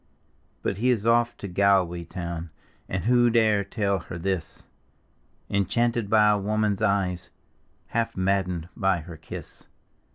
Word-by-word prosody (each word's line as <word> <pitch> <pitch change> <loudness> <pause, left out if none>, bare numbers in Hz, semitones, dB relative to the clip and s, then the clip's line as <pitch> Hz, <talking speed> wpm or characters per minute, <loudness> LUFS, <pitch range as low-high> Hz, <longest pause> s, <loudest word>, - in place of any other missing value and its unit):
But 100 - -2
he 125 +3 +2
is 115 -4 +1
off 120 +1 +3
to 100 - -6
Galway 90 -2 +2
town, 85 -2 -5 0.4
(And 95 -1 -2
who 120 +1 +4
dare 110 -3 +3
tell 100 -1 -1
her 85 -1 -8
this?) 95 -1 -3 0.8
Enchanted 115 +2 0
by 105 -1 +5
a 105 - +2
woman's 105 0 0
eyes, 95 -4 0 0.6
Half 115 0 -1
maddcncd 95 -3 0
by 95 -3 +1
her 85 +1 -10
kiss. - - -9
100 Hz, 135 wpm, -26 LUFS, 90-110 Hz, 0.8 s, by